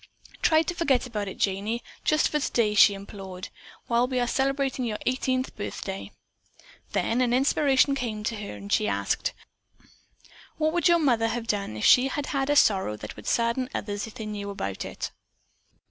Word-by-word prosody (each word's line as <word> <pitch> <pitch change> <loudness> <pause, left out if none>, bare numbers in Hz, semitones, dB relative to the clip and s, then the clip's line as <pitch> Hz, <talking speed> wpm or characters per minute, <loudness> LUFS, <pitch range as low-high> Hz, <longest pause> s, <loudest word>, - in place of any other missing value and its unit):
"Try 315 -1 +4
to 350 - -3
forget 285 -8 +1
about 210 -5 -4
it, 190 - -7
Janey, 205 +4 -1 0.2
just 310 0 +3
for 300 - 0
today," 230 -6 +1
she 205 0 +6
implored, 195 -2 -8 0.4
"while 235 +1 +2
we 255 -1 -1
are 245 - +2
celebrating 270 +1 0
your 220 -3 -2
eighteenth 255 0 0
birthday." 195 -1 -5 0.8
Then 235 +3 +1
an 245 -1 +2
inspiration 275 +1 +3
came 230 -6 -3
to 225 +1 -2
her 205 -1 -6
and 200 +1 -5
she 215 - +2
asked: - - -1 1.2
"What 310 0 +1
would 345 +1 +3
your 345 -1 +6
mother 240 -8 +2
have 230 0 -3
done 200 - -2
if 105 - -1
she 255 +1 +7
had 280 +1 -3
had 275 -1 -1
a 290 - +3
sorrow 190 - +3
that 105 0 -8
would - - -11
sadden 235 +2 +1
others 205 +1 -3
if 225 - -12
they 225 -3 -6
knew 205 -1 -5
about 100 - -4
it?" - - -5
235 Hz, 180 wpm, -26 LUFS, 205-270 Hz, 1.2 s, she